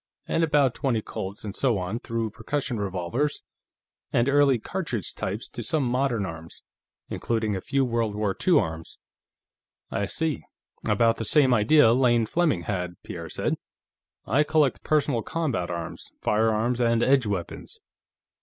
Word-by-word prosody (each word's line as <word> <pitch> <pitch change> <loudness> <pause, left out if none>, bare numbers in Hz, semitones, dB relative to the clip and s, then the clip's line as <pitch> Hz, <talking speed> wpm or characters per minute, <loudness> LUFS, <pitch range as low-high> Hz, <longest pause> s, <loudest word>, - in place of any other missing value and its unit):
And 165 - +1
about 145 -5 +3
twenty 125 -6 -1
Colts, 100 +3 -6
and 100 - -5
so 125 -6 +2
on 95 +5 -3
through 115 -2 -3
percussion 125 +1 -3
revolvers 100 +9 -2 0.7
and 120 +2 +2
early 140 -2 +4
cartridge 125 - -4
types 105 +5 -4
to 120 - -6
some 145 +6 0
modern 125 -3 0
arms, 80 -2 -9 0.5
including 110 -3 -1
a 95 - -3
few 135 +4 +1
World 115 -3 -1
War 105 -2 -1
II 175 -4 +6
arms." 80 0 -4 0.9
"I 100 - -1
see; 160 +6 -1 0.5
about 115 -1 +3
the - - -3
same 130 +3 +4
idea 115 +2 +5
Lane 120 -2 +3
Fleming 155 - +1
had," 90 -3 -3
Pierre - - -7
said. - - -1 0.7
"I 145 - +3
collect 150 -4 +1
personal 145 -6 +1
combat 130 - -2
arms, 85 -2 -6
firearms 110 +3 +1
and 115 -1 +3
edge 135 -4 +3
weapons. 95 -5 -5
115 Hz, 145 wpm, -26 LUFS, 105-140 Hz, 0.9 s, II